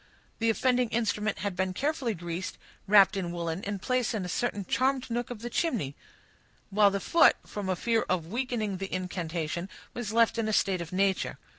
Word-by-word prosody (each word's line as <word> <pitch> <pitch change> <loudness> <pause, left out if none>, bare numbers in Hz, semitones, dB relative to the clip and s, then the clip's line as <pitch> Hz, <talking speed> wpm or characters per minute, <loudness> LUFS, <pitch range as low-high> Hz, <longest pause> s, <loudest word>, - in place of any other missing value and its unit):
The 230 0 +2
offending 250 +1 +2
instrument 215 -2 0
had 205 -3 -3
been 185 0 -1
carefully 275 -5 -1
greased, 175 +1 -5 0.3
wrapped 200 -1 +7
in 180 -3 -2
woolen, 170 +1 -3
and 200 0 -3
placed 255 +1 0
in 200 -4 -2
a - - -5
certain 205 0 -1
charmed 260 +3 0
nook 240 +1 -1
of 235 -2 -7
the 240 - -3
chimney; 215 - -1 0.8
while 205 0 +5
the 200 0 -1
foot, 335 +10 +5
from 205 -2 -5
a 185 - +2
fear 225 +5 +1
of 180 -3 0
weakening 225 -1 -2
the 195 +1 -5
incantation, 175 -1 -3 0.2
was 240 -4 -4
left 230 0 +3
in 220 - 0
a 215 - 0
state 190 -3 +2
of 165 - -7
nature. 190 0 +1
205 Hz, 190 wpm, -29 LUFS, 185-235 Hz, 0.8 s, wrapped